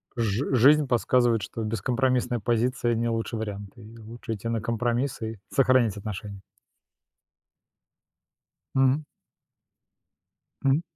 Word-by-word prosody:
жи 115 +3 -1
жизнь 145 +4 +6
подсказывает, 120 -1 +2
что 115 - -5
бескомпромиссная 120 +3 0
позиция- 120 +1 0
не 115 +1 0
лучший 115 0 -2
вариант. 100 -2 -5
И 115 0 -13
лучше 115 +1 -7
идти 110 +1 -6
на 115 -1 -1
компромисс 120 +4 -1
и 110 0 -4
сохранить 130 -6 +3
отношения. 100 -1 -6 2.3
Мгм. 135 +3 +3 1.6
Мгм. 135 +3 +3
115 Hz, 105 wpm, -26 LUFS, 110-125 Hz, 2.3 s, жизнь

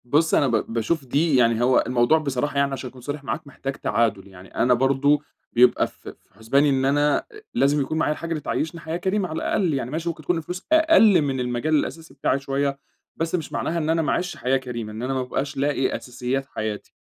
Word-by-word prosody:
بُص، 155 +6 +2
أنا 140 - +4
ب 115 -3 +1
باشوف 135 +6 -1
دي 145 +4 +1
يعني 115 -2 +3
هو 125 +1 +4
الموضوع 125 +5 +3
بصراحة 140 -1 -2
يعني 140 0 +2
عشان 130 -1 -5
أكون 125 0 -15
صريح 145 +3 -5
معاك، 145 +2 -4
محتاج 135 0 -5
تعادُل. 105 -4 0
يعني 95 -1 -15
أنا 125 +1 +3
برضه 135 +3 +3 0.3
بيبقى 125 +1 +4
في - - -12
في - - -36
حُسباني 135 +7 +2
إن 135 -1 +1
أنا 145 +1 +3
أ - - -4 0.3
لازم 145 +1 +2
يكون 140 +4 -2
معايا 150 - +1
الحاجة 165 +2 -7
اللي 160 -2 -2
تعيّشني 160 +3 -3
حياة 160 +1 -3
كريمة 190 +1 -1
على 155 - -5
الأقل، 175 -2 0
يعني 130 -2 -3
ماشي 165 +2 -2
ممكن 160 -2 -6
تكون 175 +4 0
الفلوس 180 +3 -6
أقَل 315 - +6
من 135 -3 -1
المجال 125 +5 0
الأساسي 150 0 -3
بتاعي 135 0 0
شوية، 140 0 -1 0.4
بس 165 +2 -1
مش 165 -4 -4
معناها 170 - -1
إن 160 -1 -1
أنا 165 0 +2
ما 155 - 0
أعيشش 180 0 -2
حياة 130 +1 +1
كريمة، 120 -4 -6
إن 110 +3 -6
أنا 130 +2 -1
ما 130 - 0
أبقاش 140 +2 -3
لاقي 140 -1 0
أساسيات 125 +2 -3
حياتي. 110 -5 -5
140 Hz, 220 wpm, -23 LUFS, 125-155 Hz, 0.4 s, أقَل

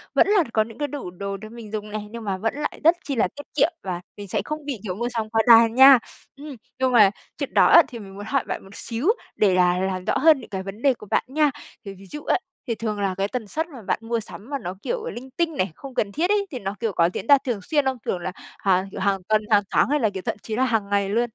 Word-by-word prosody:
vẫn - - +5
là 405 -4 +4
có 220 - +3
những 225 0 -12
cái 290 -1 -1
đủ 260 -10 -6
đồ 200 +2 -5
để 215 +2 -10
mình 225 -2 -10
dùng 210 -1 -4
này, 210 -1 -5
nhưng 230 -1 -7
mà 195 -2 -2
vẫn 225 +3 -1
lại 295 0 -4
rất 330 +2 +6
chi 275 - -3
là 220 - +2
tiết 290 - -9
kiệm 320 +3 +3
và 180 -2 -4 0.2
mình 205 -1 -8
sẽ 200 +1 -1
không 305 -1 -5
bị, 265 -7 -4
kiểu, 185 -3 -4
mua 240 +3 -2
sắm 225 -3 -3
quá 225 0 +2
đà 230 -1 +9
nha. 265 +2 +8 0.4
Ừm, 285 -1 -9 0.2
nhưng 260 -1 +2
mà 210 -5 +7 0.3
chuyện - - -4
đó - - +6
á, 340 - +9
thì 235 -3 -9
mình 195 -2 -11
muốn 205 +1 -7
hỏi 275 +2 0
bạn - - -4
một 195 +1 -14
xíu 235 +8 -3 0.3
để 200 -3 +3
là 180 0 +3
làm 185 -1 -2
rõ - - +1
hơn 310 -1 +5
những - - -12
cái 190 -2 -4
vấn 200 +4 -8
đề 275 -2 +4
của 210 -3 -13
bạn - - +2
nha. 295 +1 +2 0.3
Thì 195 - -6
ví 195 +1 -15
dụ 300 0 -7
á, - - +2 0.3
thì 230 - -1
thường 215 -2 -3
là 195 -2 -1
cái 195 +1 0
tần 225 -2 -5
suất 320 +9 -2
mà 265 -8 -11
bạn 200 - -1
mua 230 0 -2
sắm 215 +3 -11
mà 280 - -2
nó, 180 -4 -5
kiểu, 485 -2 -3
linh 260 +2 -8
tinh 330 -3 0
này, 185 -2 0
không 275 -2 -10
cần 205 -4 0
thiết 345 - 0
ấy, 410 -1 +2
thì 255 - -5
nó, 195 +1 -4
kiểu, 225 -4 -1
có 170 0 +3
diễn - - -5
ra 285 - +8
thường 235 -5 -1
xuyên 290 +7 0
không? 265 -1 0
Kiểu 180 - -1
là 180 +1 -4 0.3
hàng, 190 0 +2
kiểu, - - -7
hàng 195 0 +1
tuần, 215 0 +3
hàng 205 -1 +4
tháng - - +3
hay 295 0 +2
là 220 -4 +2
kiểu 190 -2 -6
thậm - - -1
chí 220 - -4
là 255 - +2
hàng 220 -5 0
ngày 200 -1 +1
luôn? 235 +3 +1
225 Hz, 300 wpm, -23 LUFS, 200-275 Hz, 0.4 s, đà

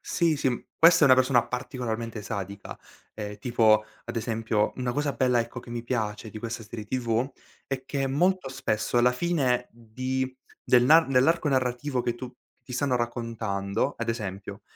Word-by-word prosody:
Sì, 165 -3 +1
sì, 130 -3 -1
questa 165 0 +6
è - - +9
una 130 - +8
persona 130 -2 +3
particolarmente 120 -3 -4
sadica, 100 -1 -6 0.4
ehm, 105 -1 -6
tipo 110 -2 +3 0.2
ad - - -6
esempio, 110 -2 0
una 125 -1 -2
cosa 145 0 -1
bella, 125 0 +2
ecco, 115 +2 -5
che 120 - -13
mi 120 -1 -4
piace 110 -3 -2
di 110 - -8
questa 115 +1 -5
serie 110 0 -7
TV 120 +1 0 0.4
è 135 -1 -4
che 135 -2 -1
molto 175 +2 +1
spesso 115 -2 -1
alla 125 +1 +4
fine 130 -5 0
di 130 +3 -4 0.3
dell'an 145 +7 +6
nell'arco 140 +5 +3
narrativo 130 0 0
che 120 - -1
tu 125 0 -8 0.3
ti 125 - -10
stanno 125 +1 +1
raccontando, 115 -4 -2
ad 120 0 -4
esempio, 100 -4 -4
120 Hz, 165 wpm, -27 LUFS, 115-130 Hz, 0.4 s, è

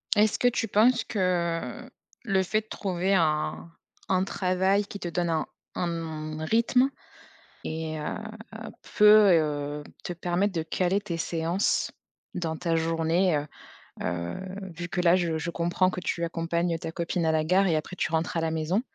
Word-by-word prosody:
Est-ce 210 0 +3
que 245 - +4
tu 240 -2 +1
penses 225 +4 +4
que, 215 - -4 0.7
heu, - - -14 0.3
le 195 -5 +2
fait 215 +4 0
de 215 - -27
trouver 190 -1 -1
un 155 -2 +1 0.4
un 185 -1 +3
travail 190 +1 +1
qui 200 - -8
te 175 - -3
donne 175 0 -1
un, 160 -1 0 0.3
hem, 160 -3 -3
un 160 - -3
rythme 235 +6 +3 0.8
et 160 0 -3
heu, 150 - -3 0.8
peut, 210 -1 +8
heu, 150 -2 0 0.2
te - - -4
permettre 180 +3 0
de 165 - 0
caler 180 +4 0
tes 175 -5 -4
séances 165 +3 0 0.4
dans 165 -2 -2
ta 170 0 -1
journée, 165 +2 +2
heu 145 0 -2 0.6
heu, 85 0 -2 0.4
vu 175 +1 -5
que 180 - -2
là, 175 0 +5
je 170 -3 0
je 170 +2 -3
comprends 175 +2 +1
que 180 - -5
tu 170 -1 -2
accompagnes 170 0 -1
ta 160 - -5
copine 170 0 -1
à 160 - +3
la 155 0 +2
gare 185 +4 +3
et 170 - +2
après 155 +4 -4
tu 170 - -1
rentres 160 +1 0
à - - +2
la 165 0 0
maison 160 +5 0
170 Hz, 175 wpm, -27 LUFS, 160-190 Hz, 0.8 s, peut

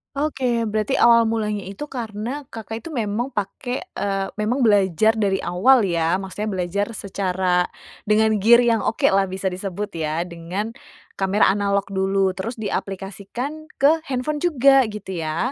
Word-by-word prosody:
Oke, 260 -5 0
berarti 215 +4 -1
awal 230 -1 +5
mulanya 210 -3 -1
itu 200 +9 -7
karena 240 +3 -5
Kakak 225 0 -7
itu - - -6
memang 230 +1 -1
pake, 245 +5 -3
eee 195 -1 -2
memang 240 +5 0
belajar 205 0 +4
dari 195 -2 +1
awal 225 +8 +4
ya, 170 -1 +1
maksudnya 195 +3 -4
belajar 190 +1 -1
secara 185 -2 0 0.4
dengan 220 +1 +4
gear 235 +4 +6
yang 230 -2 +3
oke - - -2
lah 195 0 +3
bisa 190 0 -3
disebut 195 +2 -4
ya, 160 +1 -1
dengan 180 +5 -5 0.5
kamera 195 +1 +3
analog 200 0 +1
dulu 190 0 +1
terus 225 +6 -4
diaplikasikan 210 +8 -5
ke 300 +4 +4
handphone 275 +3 -2
juga 275 -5 +4
gitu 200 -4 -6
ya? 160 - -1
205 Hz, 145 wpm, -22 LUFS, 190-235 Hz, 0.5 s, gear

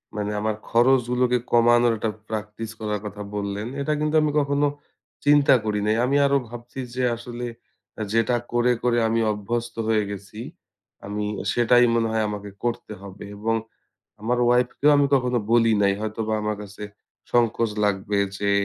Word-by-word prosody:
মানে 105 0 -2
আমার 110 0 -1
খরচগুলোকে 125 0 +3
কমানোর 120 0 +5
একটা 110 - -1 0.2
practice 110 +1 -5
করার 105 -1 -2
কথা 105 0 -7
বললেন। 100 +2 -3
এটা 150 +2 0
কিন্তু 150 +1 0
আমি 150 -1 +1
কখনো 145 0 +1 0.6
চিন্তা 145 -1 +6
করি 105 -1 0
নাই। 110 - +3
আমি 140 +2 +1
আরো 140 0 +3
ভাবছি 120 +2 -9 0.2
যে, 130 - -1
আসলে 120 +1 -7 0.7
যেটা 115 +2 +2 0.2
করে, 120 +1 +3
করে 120 -1 +2
আমি 115 +1 +1
অভ্যস্ত 115 +3 -3
হয়ে 110 -1 +2
গেছি 100 +1 -9 0.7
আমি 105 +1 -3 0.3
সেটাই 120 +1 +5
মনে 115 -1 +2
হয় 110 -1 +1
আমাকে 105 -1 -6
করতে 115 -2 -3
হবে। 100 0 -10
এবং 115 +2 0 0.7
আমার 120 +3 0
wife 125 0 +2
কেও 150 +1 +5
আমি 145 0 +4
কখনো 125 -2 +1
বলি 115 -1 +5
নাই। 100 0 +4
হয়তোবা 110 0 -2
আমার 105 0 -1
কাছে 105 +1 -11 0.5
সংকোচ 115 -1 +2
লাগবে 100 0 0 0.2
যে, 100 0 0
115 Hz, 160 wpm, -24 LUFS, 105-125 Hz, 0.7 s, চিন্তা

